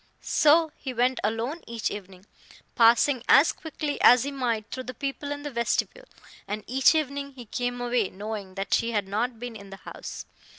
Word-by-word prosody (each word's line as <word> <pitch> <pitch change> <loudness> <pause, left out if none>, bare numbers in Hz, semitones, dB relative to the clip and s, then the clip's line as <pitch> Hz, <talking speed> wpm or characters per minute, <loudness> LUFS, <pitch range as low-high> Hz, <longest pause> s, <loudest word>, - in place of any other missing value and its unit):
So 315 +1 +4
he 260 -2 -6
went 250 +2 +2
alone 230 +9 -2
each 230 -2 -3
evening, 190 -2 -9 0.5
passing 235 +3 +4
as 285 +4 +7
quickly 305 -2 -5
as 245 -1 +7
he 280 - -3
might 240 -6 -1
through 255 -1 -5
the 255 - -7
people 280 +2 -4
in 290 0 -5
the 290 - -5
vestibule; 240 - -1 0.4
and 210 +1 -4
each 265 +5 +4
evening 280 -2 -2
he 250 -2 -10
came 245 +2 -3
away 240 -4 0
knowing 200 -1 -7
that 195 0 -3
she 230 0 +1
had 205 -3 0
not 225 +4 -2
been 245 -1 -6
in 200 -2 -11
the 195 - -9
house. - - -8
245 Hz, 185 wpm, -26 LUFS, 215-280 Hz, 0.5 s, as